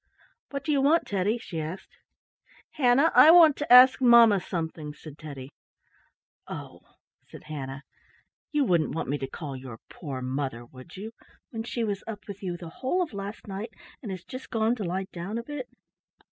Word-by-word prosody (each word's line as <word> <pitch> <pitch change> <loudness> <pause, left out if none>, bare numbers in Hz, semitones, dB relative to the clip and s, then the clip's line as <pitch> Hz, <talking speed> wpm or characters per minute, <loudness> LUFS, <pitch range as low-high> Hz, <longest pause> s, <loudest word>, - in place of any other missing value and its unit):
"What 280 -1 -5
do 305 - -1
you 280 -2 +2
want, 310 +5 +3
Teddy?" 205 +3 0
she 165 -8 -6
asked. 165 +5 -8 0.8
"Hannah, 275 +3 +3
I 310 - +8
want 325 -4 +8
to 295 - -4
ask 255 +2 +8
mamma 235 -4 +7
something," 160 -4 -5
said 155 -1 -12
Teddy. 140 -4 -9 1.0
"Oh," - - -8 0.5
said - - -13
Hannah, 135 -2 -7 0.7
"you 295 -1 +2
wouldn't 170 -8 +1
want 165 - -3
me 145 +1 -1
to 135 - -3
call 140 0 -7
your 130 -3 -9
poor 135 -6 -6
mother, 130 -2 -3
would 130 +8 -14
you, 215 +4 -7 0.4
when 225 - -4
she 235 +1 -3
was 205 -3 -3
up 210 -3 -8
with 200 -1 -8
you 180 -3 -4
the 170 -1 -9
whole 360 +8 +1
of 320 - -8
last 200 +2 -7
night 210 +3 -6 0.3
and 220 - -7
has 185 -2 -6
just 255 +1 -9
gone 225 0 +1
to 215 - -4
lie 185 +2 -2
down 185 +6 -5
a 235 - -4
bit?" 270 -1 -7
195 Hz, 185 wpm, -27 LUFS, 155-245 Hz, 1.0 s, I